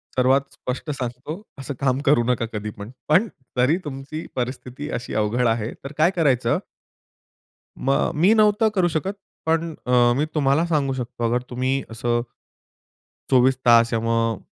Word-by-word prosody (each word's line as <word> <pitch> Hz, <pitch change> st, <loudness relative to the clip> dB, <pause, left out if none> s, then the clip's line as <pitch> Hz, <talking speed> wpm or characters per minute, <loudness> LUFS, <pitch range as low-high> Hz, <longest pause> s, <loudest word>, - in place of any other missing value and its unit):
सर्वात 130 Hz, +2 st, +4 dB
स्पष्ट 130 Hz, +5 st, -5 dB
सांगतो 135 Hz, +6 st, -5 dB, 0.2 s
असं 135 Hz, +1 st, -5 dB
काम 135 Hz, -1 st, +1 dB
करू 135 Hz, -5 st, +4 dB
नका 125 Hz, -2 st, +1 dB
कधीपण. 105 Hz, 0 st, -6 dB, 0.2 s
पण 180 Hz, +9 st, +4 dB, 0.3 s
जरी 130 Hz, +7 st, +3 dB
तुमची 145 Hz, +3 st, -6 dB
परिस्थिती 130 Hz, +3 st, -4 dB
अशी 125 Hz, -, -8 dB
अवघड 110 Hz, +3 st, +1 dB
आहे 115 Hz, +1 st, 0 dB
तर 140 Hz, -, -6 dB
काय 165 Hz, +4 st, +4 dB
करायचं 130 Hz, -8 st, +2 dB, 1.2 s
मग 135 Hz, +1 st, +1 dB
मी 180 Hz, +8 st, +5 dB
नव्हतं 215 Hz, 0 st, +4 dB
करू 180 Hz, -2 st, +3 dB
शकत 175 Hz, +5 st, -2 dB, 0.3 s
पण 165 Hz, 0 st, 0 dB
अ, -, -, 0 dB, 0.3 s
मी 150 Hz, -, +2 dB
तुम्हाला 145 Hz, +2 st, +3 dB
सांगू 150 Hz, -5 st, 0 dB
शकतो 120 Hz, -2 st, -5 dB
अगर 120 Hz, +1 st, +1 dB
तुम्ही 130 Hz, +2 st, 0 dB
असं. 120 Hz, +1 st, -1 dB, 1.1 s
24 130 Hz, 0 st, +4 dB
तास 115 Hz, -1 st, +6 dB
किंवा 115 Hz, -1 st, -1 dB, 0.3 s
मग 110 Hz, -, -7 dB
130 Hz, 150 wpm, -23 LUFS, 120-155 Hz, 1.2 s, तास